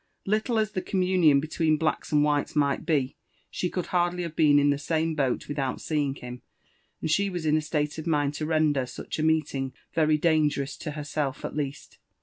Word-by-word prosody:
Little 215 Hz, +3 st, 0 dB
ai 220 Hz, -, +4 dB
the 210 Hz, -3 st, -4 dB
communion 180 Hz, -7 st, +3 dB
between 155 Hz, +1 st, +1 dB
blacks 155 Hz, 0 st, -1 dB
and 150 Hz, -1 st, +4 dB
whites 145 Hz, 0 st, 0 dB
might 140 Hz, -2 st, +1 dB
be, 140 Hz, -5 st, 0 dB, 0.3 s
she 180 Hz, -, -2 dB
could 180 Hz, -1 st, -3 dB
hardly 175 Hz, 0 st, +1 dB
have 165 Hz, -2 st, -6 dB
been 150 Hz, -3 st, +5 dB
in 145 Hz, 0 st, +4 dB
the 140 Hz, -, -1 dB
same 160 Hz, +2 st, 0 dB
boat 135 Hz, -5 st, -1 dB
without 140 Hz, -3 st, -2 dB
seeing 145 Hz, -3 st, -1 dB
him, 125 Hz, -2 st, -9 dB, 0.6 s
and 160 Hz, -, -1 dB
she 200 Hz, +4 st, +2 dB
was 175 Hz, -4 st, -4 dB
in 155 Hz, 0 st, +3 dB
a 155 Hz, -, +2 dB
state 150 Hz, 0 st, -2 dB
of 160 Hz, -, -6 dB
mind 145 Hz, -3 st, +1 dB
to 155 Hz, +1 st, -3 dB
render 155 Hz, -5 st, +2 dB
such 125 Hz, -, -6 dB
a -, -, +1 dB
meeting 150 Hz, -4 st, 0 dB, 0.2 s
very 155 Hz, -1 st, +3 dB
dangerous 150 Hz, -3 st, +1 dB
to 155 Hz, -, -5 dB
herself 145 Hz, -2 st, -3 dB
at -, -, -5 dB
least. 145 Hz, -1 st, -5 dB
155 Hz, 200 wpm, -27 LUFS, 145-165 Hz, 0.6 s, been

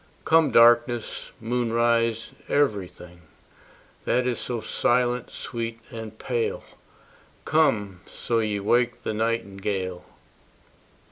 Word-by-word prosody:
Come 160 Hz, -1 st, +4 dB
darkness, 120 Hz, 0 st, +3 dB
moonrise, 115 Hz, -1 st, 0 dB, 0.2 s
every 110 Hz, -10 st, +1 dB
thing 90 Hz, 0 st, -15 dB, 0.8 s
That 125 Hz, +1 st, +1 dB
is 125 Hz, -2 st, -1 dB
so 120 Hz, -2 st, -3 dB
silent, 120 Hz, +2 st, 0 dB
sweet, 115 Hz, -1 st, -5 dB
and 110 Hz, -2 st, -8 dB
pale: 120 Hz, -2 st, -2 dB, 0.8 s
Come, 105 Hz, -, +1 dB
so 115 Hz, -1 st, -2 dB
ye 105 Hz, -2 st, -1 dB
wake 120 Hz, +4 st, +1 dB
the -, -, -2 dB
nightingale. 100 Hz, -5 st, -2 dB
115 Hz, 95 wpm, -25 LUFS, 105-120 Hz, 0.8 s, Come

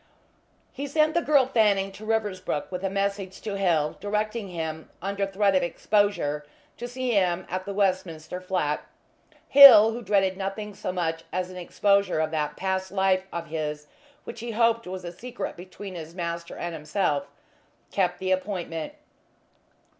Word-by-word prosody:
He 280 Hz, +2 st, -5 dB
sent 305 Hz, +2 st, +2 dB
the 340 Hz, -, +2 dB
girl 290 Hz, -5 st, +4 dB
Fanning 205 Hz, -6 st, +2 dB
to 210 Hz, +2 st, -11 dB
Riversbrook 205 Hz, -9 st, -1 dB
with 180 Hz, 0 st, -4 dB
a 195 Hz, -, 0 dB
message 195 Hz, -1 st, -2 dB
to 205 Hz, -2 st, -4 dB
Hill, 170 Hz, -6 st, +1 dB
directing 210 Hz, +1 st, -2 dB
him, 160 Hz, -3 st, -5 dB
under 200 Hz, +1 st, -2 dB
threat 195 Hz, 0 st, +2 dB
of 185 Hz, -, +3 dB
exposure, 175 Hz, -5 st, 0 dB, 0.3 s
to 240 Hz, -, -5 dB
see 255 Hz, 0 st, -2 dB
him 185 Hz, -4 st, +1 dB
at 185 Hz, +1 st, -3 dB
the 200 Hz, -, -4 dB
Westminster 185 Hz, -4 st, -1 dB
flat. 180 Hz, -5 st, -1 dB, 0.6 s
Hill, 260 Hz, -6 st, +10 dB
who 235 Hz, +2 st, -5 dB
dreaded 195 Hz, -3 st, +1 dB
nothing 195 Hz, +2 st, -4 dB
so 190 Hz, -, -4 dB
much 165 Hz, -2 st, -2 dB
as 185 Hz, 0 st, -2 dB
an 185 Hz, -, -9 dB
exposure 200 Hz, 0 st, +1 dB
of 155 Hz, 0 st, 0 dB
that 150 Hz, -2 st, -2 dB
past 190 Hz, 0 st, -2 dB
life 190 Hz, -1 st, +1 dB
of 170 Hz, -1 st, -4 dB
his 150 Hz, -1 st, -3 dB, 0.4 s
which -, -, -8 dB
he 235 Hz, +1 st, -5 dB
hoped 230 Hz, 0 st, +2 dB
was 185 Hz, 0 st, -6 dB
a 175 Hz, -, -5 dB
secret 230 Hz, +2 st, -6 dB
between 185 Hz, +2 st, -9 dB
his 165 Hz, -1 st, -8 dB
master 170 Hz, -1 st, -4 dB
and 175 Hz, 0 st, -4 dB
himself, 150 Hz, -1 st, -1 dB, 0.6 s
kept 180 Hz, -2 st, +1 dB
the 185 Hz, 0 st, -2 dB
appointment. 185 Hz, -, -2 dB
190 Hz, 160 wpm, -26 LUFS, 175-205 Hz, 0.6 s, Hill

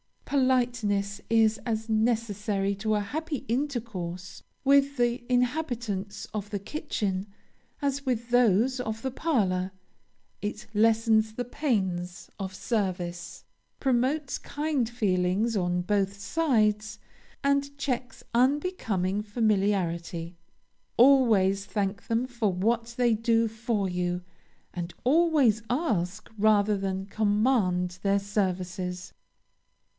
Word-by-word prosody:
Politeness 240 Hz, -7 st, +1 dB
is 225 Hz, -1 st, +3 dB
as 225 Hz, -2 st, -2 dB
necessary 215 Hz, -3 st, 0 dB
to 215 Hz, +2 st, 0 dB
a 210 Hz, -, +1 dB
happy 295 Hz, +7 st, -4 dB
intercourse 220 Hz, -9 st, -3 dB, 0.2 s
with 280 Hz, 0 st, +4 dB
the 240 Hz, 0 st, +1 dB
inhabitants 245 Hz, -7 st, -1 dB
of 205 Hz, -1 st, -4 dB
the 205 Hz, -, -2 dB
kitchen, 200 Hz, -5 st, -3 dB, 0.6 s
as 280 Hz, 0 st, 0 dB
with 240 Hz, -2 st, -1 dB
those 245 Hz, +1 st, +3 dB
of 220 Hz, -3 st, -3 dB
the 265 Hz, -, -1 dB
parlor; 195 Hz, -, 0 dB, 0.7 s
it 210 Hz, +1 st, -4 dB
lessens 220 Hz, 0 st, +3 dB
the 245 Hz, +2 st, -3 dB
pains 190 Hz, -, -2 dB
of 190 Hz, -1 st, -5 dB
service, 180 Hz, -6 st, -3 dB, 0.4 s
promotes 265 Hz, +2 st, 0 dB
kind 290 Hz, -6 st, -1 dB
feelings 205 Hz, -1 st, +1 dB
on 180 Hz, -1 st, 0 dB
both 200 Hz, +1 st, 0 dB
sides, 215 Hz, -5 st, +1 dB, 0.5 s
and 280 Hz, 0 st, +1 dB
checks 255 Hz, -2 st, -3 dB
unbecoming 235 Hz, -, +1 dB
familiarity; 195 Hz, -6 st, 0 dB, 0.6 s
always 220 Hz, -7 st, +5 dB
thank 200 Hz, -2 st, -2 dB
them 230 Hz, +2 st, +1 dB
for 235 Hz, -5 st, -1 dB
what 230 Hz, +5 st, 0 dB
they 240 Hz, -2 st, +3 dB
do 230 Hz, +1 st, +2 dB
for 220 Hz, -2 st, -1 dB
you, 180 Hz, 0 st, -2 dB, 0.5 s
and 175 Hz, -1 st, -5 dB
always 280 Hz, -6 st, +4 dB
ask 215 Hz, -, -1 dB
rather 210 Hz, 0 st, +4 dB
than 190 Hz, 0 st, -2 dB
command 205 Hz, -4 st, +1 dB
their 200 Hz, 0 st, +2 dB
services. 185 Hz, -2 st, -3 dB
215 Hz, 105 wpm, -27 LUFS, 195-245 Hz, 0.7 s, always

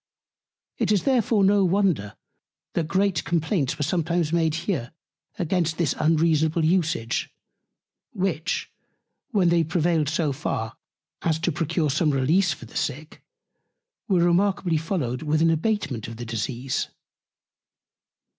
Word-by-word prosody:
It -, -, +1 dB
is 205 Hz, -3 st, +2 dB
therefore 240 Hz, -5 st, +2 dB
no 200 Hz, +1 st, +4 dB
wonder, 180 Hz, -, +1 dB, 0.6 s
that 165 Hz, -2 st, -1 dB
great 190 Hz, -1 st, +1 dB
Complaints 160 Hz, -3 st, 0 dB
were 150 Hz, -, -1 dB
sometimes 170 Hz, +1 st, 0 dB
made 160 Hz, -2 st, +2 dB
here 155 Hz, -, -2 dB, 0.4 s
against 170 Hz, -2 st, 0 dB
this 165 Hz, -6 st, +1 dB
unreasonable 160 Hz, 0 st, +2 dB
Usage; 155 Hz, -9 st, 0 dB, 0.8 s
which, 185 Hz, -, -2 dB, 0.6 s
when 195 Hz, -8 st, +3 dB
they 170 Hz, -1 st, +3 dB
prevailed 160 Hz, -2 st, +1 dB
so 155 Hz, -2 st, 0 dB
far, 115 Hz, -5 st, -3 dB, 0.5 s
as 160 Hz, -2 st, +1 dB
to 165 Hz, +2 st, -1 dB
procure 160 Hz, -1 st, 0 dB
some 155 Hz, +3 st, +2 dB
Release 150 Hz, +7 st, +2 dB
for 120 Hz, -, -6 dB
the 115 Hz, -, -16 dB
Sick, 150 Hz, +4 st, -4 dB, 0.9 s
were 185 Hz, -5 st, +3 dB
remarkably 180 Hz, -1 st, +2 dB
followed 150 Hz, -7 st, -2 dB
with 155 Hz, 0 st, +1 dB
an 165 Hz, -, +4 dB
Abatement 155 Hz, -, -1 dB
of 115 Hz, -1 st, -8 dB
the 120 Hz, -, -6 dB
Disease. 120 Hz, +3 st, -2 dB
165 Hz, 125 wpm, -24 LUFS, 150-180 Hz, 0.9 s, no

